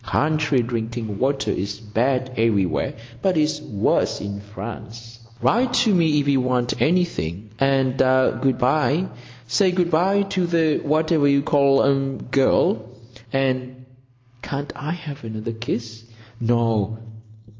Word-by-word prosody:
Country 150 -2 +1
drinking 115 -3 -4
water 135 +1 0
is 100 +2 -3
bad 125 +4 -1
everywhere, 100 - +1 0.3
but 185 -3 +1
it's 150 -1 +1
worse 105 -8 0
in 100 0 -5
France. 115 +2 -9 0.2
Write 245 +3 +2
to 230 -4 +3
me 160 -4 +3
if 145 - -1
you 135 -2 +3
want 125 -1 -1
anything, 110 - 0
and 135 -1 +1
good 130 0 +2
bye. 145 +6 +2 0.4
Say 125 - +2
good 180 -1 0
bye 190 +5 +3
to 185 -2 -1
the 165 -3 +2
whatever 155 0 +2
you 140 0 +3
call 140 -2 +3
um 135 0 +1
girl, 130 -4 +3 0.5
and—can't 130 0 -5
I 145 +1 -6
have 150 -5 -8
another 110 0 -5
kiss? 115 0 -5 0.4
No. 115 -2 +1
130 Hz, 125 wpm, -22 LUFS, 115-150 Hz, 0.5 s, to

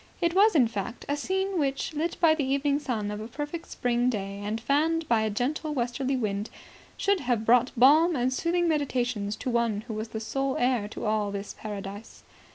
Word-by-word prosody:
It 340 -1 +1
was, 405 +1 +5
in 255 -6 +5
fact, 220 +1 -5
a 285 - 0
scene 380 +4 -1
which, 275 +1 -1
lit 325 +3 -2
by 330 -3 +5
the 315 -2 -1
evening 280 +2 +1
sun 220 -8 -2
of 210 0 -5
a 220 - -6
perfect 295 +6 -6
spring 245 0 +1
day 200 -3 -3
and 215 +2 -2
fanned 310 +6 +1
by 230 -2 +3
a 220 - 0
gentle 295 +8 -2
westerly 255 +2 -1
wind, 210 -3 -2 0.5
should 400 -1 +2
have 240 -6 -1
brought 245 +2 +4
balm 310 +7 +6
and 255 0 +1
soothing 345 +4 +1
meditations 245 -9 -1
to 255 +3 -4
one 230 -3 +1
who 225 0 -7
was 215 +1 -4
the 220 - -5
sole 270 +4 -2
heir 245 -4 +1
to 210 - -7
all 215 -1 +1
this 200 0 -5
Paradise. 205 0 -8
250 Hz, 200 wpm, -27 LUFS, 220-295 Hz, 0.5 s, balm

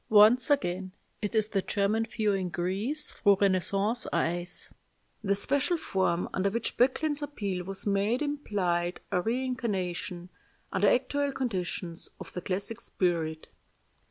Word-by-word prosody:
Once 220 +3 +7
again 185 -8 +1 0.3
it 210 +1 -2
is 215 -1 +2
the 195 -3 +1
German 210 +4 +1
viewing 200 -5 0
Greece 195 - 0
through 200 -2 +4
Renaissance 200 +4 +2
eyes. 175 +1 -1 0.6
The 200 0 +2
special 285 - +1
form 185 - 0
under 195 +1 +1
which 230 +3 -2
Böcklin's 290 +4 +2
appeal 200 -11 -3
was 195 0 -4
made 205 +6 +1
implied 185 -12 -1
a 180 - +2
reincarnation, 205 -7 -2 0.4
under 195 +1 +3
actual 285 +3 +1
conditions, 185 -9 -3
of - - -9
the 180 - -4
classic 200 +5 -2
spirit. 160 -3 -1
200 Hz, 130 wpm, -29 LUFS, 180-240 Hz, 0.6 s, Once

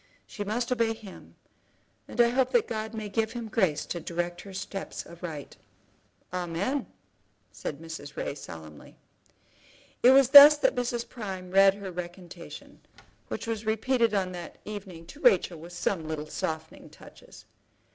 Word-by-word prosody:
She 205 - -6
must 235 +5 -2
obey 230 -2 +1
him, 215 -4 -13 0.7
and - - -10
I 235 0 +6
hope 255 +1 +2
that 480 -3 +3
God 220 0 -4
may 215 -1 -4
give 220 +2 -1
him 235 -2 -5
grace 185 -10 +1
to 175 - -4
direct 175 +1 -3
her 200 - -11
steps 195 +1 -6
aright." 165 -4 -8 0.8
"Amen!" 180 +10 -2 0.6
said 145 - -6
Mrs. 160 -3 -8
Ray, - - -3
solemnly. 80 - -11 1.0
It 245 - +7
was 265 -1 +6
thus 290 +2 +11
that - - +2
Mrs. 240 -1 -2
Prime 190 -6 -7
read 195 0 +6
her 200 -2 -7
recantation, 175 0 -9 0.5
which - - -5
was 225 -2 -3
repeated 225 +1 +1
on 185 -2 0
that 175 -2 -8
evening 195 -5 -8
to 180 - -13
Rachel 185 - +3
with 170 +2 -11
some 175 -2 -2
little 155 -1 -4
softening 160 +1 -5
touches. - - -15
195 Hz, 150 wpm, -28 LUFS, 170-230 Hz, 1.0 s, thus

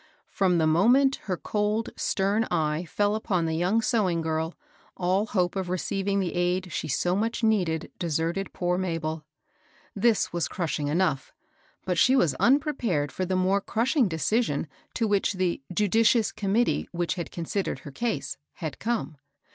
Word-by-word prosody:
From 185 -3 +2
the 160 - +3
moment 245 - +4
her 185 -3 -1
cold, 210 +3 -1
stem 205 +3 0
eye 160 0 0
fell 205 +5 0
upon 195 -6 0
the 160 0 -1
young 185 +7 +1
sewing 195 -8 +1
girl, 160 +1 -2 0.4
all 190 +4 +1
hope 180 -4 0
of 190 -2 -2
receiving 195 +2 -1
the 185 -3 -1
aid 180 +1 0
she - - -2
so 175 +5 +1
much 225 +3 -1
needed 180 -8 +1
deserted 170 +3 -1
poor 180 0 -1
Mabel. 165 -4 -2 0.7
This 215 -1 +2
was 170 -1 0
crushing 160 -4 -2
enough; 155 -3 0 0.5
but 180 -2 0
she 260 - +5
was 170 - +3
unprepared 240 - +2
for 185 - -2
the 185 - 0
more 190 +2 +2
crushing 240 +4 +1
decision 160 - 0 0.3
to 230 - +1
which 205 0 +1
the 185 -5 -1
*^ - - -14
judicious 220 +3 +3
committee 215 +4 0
which 170 -3 -1
had 175 -3 -5
considered 180 +3 -3
her 145 - -9
case'' 215 - -3 0.2
had 160 -4 -6
come. 220 -9 -2
185 Hz, 160 wpm, -26 LUFS, 165-215 Hz, 0.7 s, she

